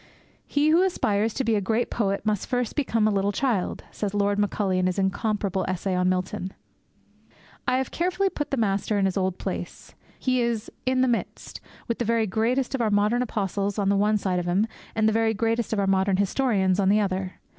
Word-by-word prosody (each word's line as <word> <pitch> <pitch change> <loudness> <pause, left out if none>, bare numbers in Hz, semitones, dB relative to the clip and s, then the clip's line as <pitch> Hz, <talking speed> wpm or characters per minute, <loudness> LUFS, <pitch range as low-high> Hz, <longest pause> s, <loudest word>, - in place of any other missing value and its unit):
'He 290 +1 +2
who 330 +3 +5
aspires 225 - +1
to 270 - 0
be 230 -2 +1
a 205 - +1
great 220 +5 0
poet 200 -3 -1
must 210 -2 0
first 245 -3 -1
become 230 -7 +1
a - - +2
little 200 0 +1
child!' 220 -5 -1
says 205 -1 -3
Lord 205 0 +1
Macaulay 200 -2 0
in 185 - +2
his 185 - -1
incomparable 195 0 0
essay 185 +1 -2
on 180 0 +2
Milton. 185 0 -2 1.1
I 255 - +3
have 265 -1 -2
carefully 370 +3 0
put 295 - -4
the 275 - -1
Master 205 -1 0
in 195 - +2
His 190 - 0
old 185 -2 0
place. - - -6 0.2
He 255 -1 +1
is 235 -2 -2 0.2
in 255 0 +2
the 260 - +3
midst, 240 -2 -3 0.3
with 235 - -2
the 240 - 0
very 230 0 +2
greatest 230 +7 0
of 270 - 0
our 225 - +2
modern 210 +4 +2
apostles 200 -3 -2
on 200 -2 +1
the 200 - +3
one 210 +2 +3
side 185 -3 -1
of 175 - -4
Him, 190 +5 +2 0.3
and 220 -1 +3
the 220 - +2
very 225 0 +2
greatest 230 +2 0
of 220 - 0
our 200 - +1
modern 190 0 +2
historians 200 -2 +1
on 195 -1 +3
the 210 +2 +4
other. 190 -2 -2
210 Hz, 215 wpm, -25 LUFS, 195-235 Hz, 1.1 s, who